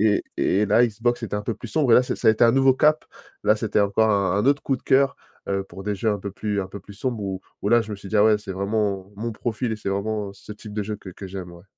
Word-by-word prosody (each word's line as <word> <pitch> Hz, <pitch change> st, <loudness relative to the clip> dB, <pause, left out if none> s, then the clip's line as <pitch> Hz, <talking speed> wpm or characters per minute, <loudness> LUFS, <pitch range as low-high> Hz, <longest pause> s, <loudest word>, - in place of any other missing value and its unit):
et -, -, -2 dB
et 95 Hz, -, +2 dB
et -, -, +3 dB
la 115 Hz, +4 st, +5 dB
Xbox, 115 Hz, +3 st, -1 dB
c'était 110 Hz, -2 st, -3 dB
un 105 Hz, -, -2 dB
peu 115 Hz, -, -2 dB
plus -, -, -9 dB
sombre 145 Hz, -7 st, +1 dB
et -, -, +9 dB
là -, -, +7 dB
c'est -, -, -3 dB
ça -, -, -1 dB
a -, -, +9 dB
été 110 Hz, -, +2 dB
un 115 Hz, -, +6 dB
nouveau 135 Hz, 0 st, +5 dB
cap, 150 Hz, +3 st, +3 dB, 0.4 s
là, 105 Hz, -, +4 dB
c'était 110 Hz, -1 st, 0 dB
encore 105 Hz, +2 st, +3 dB
un 100 Hz, -2 st, +2 dB
un 105 Hz, -, +1 dB
autre 145 Hz, 0 st, +2 dB
coup 135 Hz, -, +1 dB
de -, -, -13 dB
cœur, 135 Hz, 0 st, +3 dB, 0.3 s
heu, 100 Hz, 0 st, -1 dB
pour 95 Hz, 0 st, -11 dB
des 105 Hz, 0 st, -1 dB
jeux 110 Hz, +3 st, 0 dB
un 105 Hz, -, 0 dB
peu 100 Hz, 0 st, -6 dB
plus 105 Hz, 0 st, -2 dB
un 95 Hz, -, -2 dB
peu 100 Hz, +1 st, -9 dB
plus 100 Hz, +2 st, -13 dB
sombres 120 Hz, -1 st, -3 dB
où 95 Hz, -1 st, -3 dB, 0.2 s
où 100 Hz, -, -1 dB
là 120 Hz, 0 st, +5 dB
je 105 Hz, -, -9 dB
me -, -, -3 dB
suis 100 Hz, 0 st, -11 dB
dit: 110 Hz, -, +1 dB
«Ah 105 Hz, -, +6 dB
ouais, 110 Hz, -1 st, +5 dB
c'est 100 Hz, -2 st, -7 dB
vraiment 100 Hz, 0 st, -1 dB
mon 115 Hz, +3 st, -4 dB
profil, 110 Hz, 0 st, -3 dB
c'est 100 Hz, -, -4 dB
vraiment 100 Hz, 0 st, -2 dB
ce 100 Hz, -, -12 dB
type 105 Hz, 0 st, -11 dB
de 105 Hz, -, -1 dB
jeu 105 Hz, +1 st, -4 dB
que 95 Hz, -2 st, -11 dB
que 95 Hz, +2 st, -9 dB
j'aime», 90 Hz, -2 st, -7 dB
ouais. 85 Hz, +1 st, -14 dB
105 Hz, 315 wpm, -23 LUFS, 100-115 Hz, 0.4 s, et